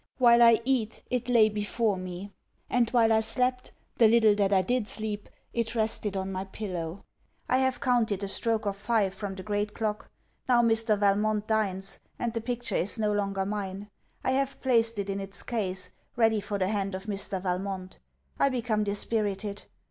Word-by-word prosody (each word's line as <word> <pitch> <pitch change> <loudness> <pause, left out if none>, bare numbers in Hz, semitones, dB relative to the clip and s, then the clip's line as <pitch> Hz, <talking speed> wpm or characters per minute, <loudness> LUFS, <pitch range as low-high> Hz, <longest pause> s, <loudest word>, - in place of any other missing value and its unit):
While 240 -2 +6
I 230 -1 +7
eat, 245 -5 0
it 250 0 -1
lay 230 -3 +6
before 210 0 0
me; 185 +2 -7 0.4
and 240 -2 +3
while 230 -2 +4
I 220 - +5
slept, 250 +3 0 0.3
the 230 - +8
little 220 -1 +5
that 205 -1 +1
I 190 -2 +4
did 245 +1 0
sleep, 215 -2 -4 0.2
it 235 0 -1
rested 215 -2 0
on 190 0 -3
my 190 0 -3
pillow. 185 -3 -5 0.4
I 255 - +3
have 260 -1 +1
counted 235 -6 +1
the 200 - -2
stroke 225 +2 0
of 200 -1 -1
five, 205 -1 +1
from 195 -1 -5
the 190 - -8
great 205 0 -2
clock. 215 -2 -3 0.4
Now 240 -1 +5
Mr. 225 -2 +2
Valmont 210 +1 +2
dines; 195 -3 -1 0.2
and 235 -2 -2
the 230 - -2
picture 245 +1 -3
is 195 - 0
no 210 -1 +1
longer 195 -1 -1
mine. 200 0 -4 0.3
I - - +1
have 275 +1 0
placed 230 -3 +3
it 200 -1 -2
in 195 0 -2
its 195 -2 -5
case, 190 -6 -2 0.2
ready 225 -2 +3
for 200 0 -3
the 190 -1 0
hand 195 -2 -1
of 190 +1 -7
Mr. 200 -2 -2
Valmont. 185 0 -3 0.4
I 275 - +4
become 235 -4 0
dispirited. 205 -1 -1
210 Hz, 185 wpm, -28 LUFS, 195-230 Hz, 0.4 s, the